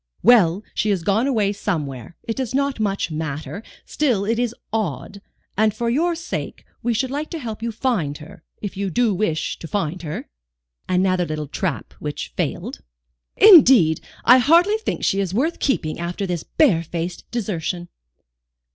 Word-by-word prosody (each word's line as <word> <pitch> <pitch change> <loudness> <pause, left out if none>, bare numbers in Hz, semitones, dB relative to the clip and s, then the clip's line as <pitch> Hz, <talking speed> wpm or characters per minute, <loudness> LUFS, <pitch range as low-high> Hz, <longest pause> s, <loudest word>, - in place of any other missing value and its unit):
"Well, 205 -5 +5
she 215 - 0
has 190 -5 0
gone 210 +8 +2
away 215 -7 +1
somewhere. 150 - -4
It 225 - -3
does 260 -1 -3
not 280 -2 0
much 200 -5 -1
matter, 155 +5 -4 0.2
still 245 -10 0
it 230 +2 0
is 240 -1 -1 0.2
odd, 200 - -3 0.3
and 215 0 +2
for 235 -1 -1
your 335 +7 +1
sake 340 +2 -5 0.2
we 240 - 0
should 255 +3 -1
like 295 +2 -3
to 335 - -4
help 225 -7 -6
you 235 - -2
to 220 - -19
find 180 - 0
her, 150 +1 -13 0.2
if 205 - -4
you 195 0 -2
do 230 +3 +2
wish 175 -5 -1
to 165 - -7
find 180 -2 -2
her?" 155 -3 -6 0.6
Another 185 -1 +2
little 155 -1 -3
trap - - -3
which - - -5
failed. - - -3 0.6
"Indeed 265 - +7 0.2
I 250 +2 +8
hardly 340 - +4
think 440 - -4
she 195 - +2
is 195 -1 -2
worth 310 +9 0
keeping 160 - -1
after 175 +3 -3
this 175 -3 -2
barefaced 170 - 0
desertion." 180 -6 -3
205 Hz, 165 wpm, -21 LUFS, 170-245 Hz, 0.6 s, I